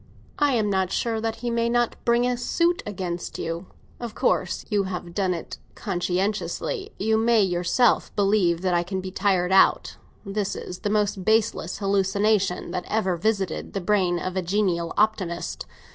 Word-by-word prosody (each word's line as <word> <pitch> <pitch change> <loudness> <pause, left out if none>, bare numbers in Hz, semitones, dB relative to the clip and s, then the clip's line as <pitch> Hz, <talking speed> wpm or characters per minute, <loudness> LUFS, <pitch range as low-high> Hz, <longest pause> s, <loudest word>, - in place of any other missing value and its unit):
I'm 250 -8 +2
not 190 -2 0
sure 225 -2 -1
that 225 0 -3
he 240 - 0
may 235 0 +1
not 240 0 +1
bring 235 +1 +3
a 250 0 +1
suit 340 +8 +1
against 180 -4 -4
you. 165 +3 -4 0.3
Of 235 -3 -6
course - - 0
you 205 -3 +1
have 180 -2 -5
done 185 -2 0
it 165 - -7 0.2
conscientiously; 205 - -2
you 220 +2 +1
have - - 0
made 215 -6 +4
yourself 175 +8 +2
believe 195 -4 +2
that 185 -1 +1
I 175 - +3
can 190 +2 -3
be 185 0 -6
tired 185 -2 +1
out. 190 - +4 0.3
This 200 0 -2
is 180 - -7
the 210 - -2
most 205 -2 0
baseless 220 -4 +1
hallucination 195 -1 +1
that 180 0 -3
ever 200 -4 0
visited 195 -1 -1
the 195 - -1
brain 180 -2 +2
of 185 +1 -4
a 185 - +1
genial 175 -3 0
optimist. 195 -5 0
195 Hz, 170 wpm, -25 LUFS, 180-220 Hz, 0.3 s, made